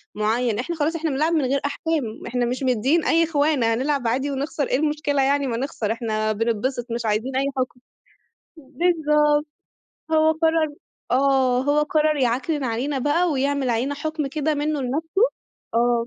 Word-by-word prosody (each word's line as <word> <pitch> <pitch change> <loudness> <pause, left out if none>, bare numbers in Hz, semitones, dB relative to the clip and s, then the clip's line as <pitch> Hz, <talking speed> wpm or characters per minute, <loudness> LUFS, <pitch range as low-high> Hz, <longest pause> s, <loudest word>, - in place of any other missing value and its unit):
مُعيّن، 220 +1 0
إحنا 340 +7 -3
خلاص 320 +2 0
إحنا 320 -1 -1
بنلعب 310 +5 +1
من 300 -5 +2
غير 275 +2 +1
أحكام، 285 -6 -2
إحنا 245 0 0
مش 250 +3 -3
مدِّيين 260 +6 +2
أي 330 0 +3
خِوانَة 290 -7 +1
هنلعب 265 0 0
عادي 270 +5 0
ونخسر 280 +1 -2
إيه 255 - +1
المشكلة 295 -2 0
يعني، 280 0 +2
ما 230 -2 -2
نخسر 235 -5 -2
إحنا 215 -2 -1
بِننبِسِط، 230 +3 -1
مش 235 -1 -3
عايزين 220 +5 -1
أي 270 +1 +1
حُكم. 255 -1 -2 0.8
بالضبط. 300 0 +1 0.7
هو 315 0 +4
قرّر 320 -2 +1 0.4
آه، 260 -1 +3
هو 290 +2 +2
قرّر 305 0 +1
يِعكنِن 265 +3 0
علينا 255 +4 -1
بقى 325 +6 +1
ويعمل 275 -2 0
علينا 255 +5 0
حُكم 310 0 -3
كده 305 +2 -1
منّه 295 0 -1
لنفسه 320 - -1 0.5
آه، 235 0 +2
275 Hz, 160 wpm, -23 LUFS, 245-305 Hz, 0.8 s, هو